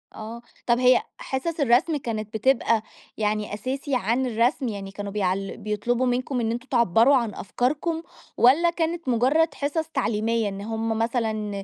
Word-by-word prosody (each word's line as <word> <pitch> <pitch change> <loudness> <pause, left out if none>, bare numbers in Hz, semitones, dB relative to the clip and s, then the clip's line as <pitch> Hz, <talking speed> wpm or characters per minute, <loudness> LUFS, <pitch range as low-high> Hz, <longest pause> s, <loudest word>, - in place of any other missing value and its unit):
آه. 225 +2 -7 0.3
طب 240 +1 +3
هي 250 0 +5 0.2
حِصَص 310 +5 -3
الرسم 280 +4 +3
كانت 220 -5 -5
بتبقى 230 -2 +2 0.4
يعني 210 -1 -1
أساسي 265 +5 -3
عن 240 +3 +1
الرسم؟ 245 +3 +1
يعني 200 -3 -5
كانوا 200 0 -6
بيعل 195 -1 -1
بيطلبوا 215 +4 -1
منكم 250 +1 -1
إن 225 -1 0
أنتم 240 +3 -5
تِعبّروا 235 +2 +4
عن 235 -5 0
أفكاركم، 300 - -1 0.4
والّا 295 +8 +5
كانت 335 -3 -2
مُجرّد 265 +8 +3
حِصَص 310 +3 -2
تعليمية، 230 -6 0
إن 195 0 -7
هم 225 +1 -2
مثلًا 220 -4 -1
235 Hz, 150 wpm, -25 LUFS, 215-265 Hz, 0.4 s, هي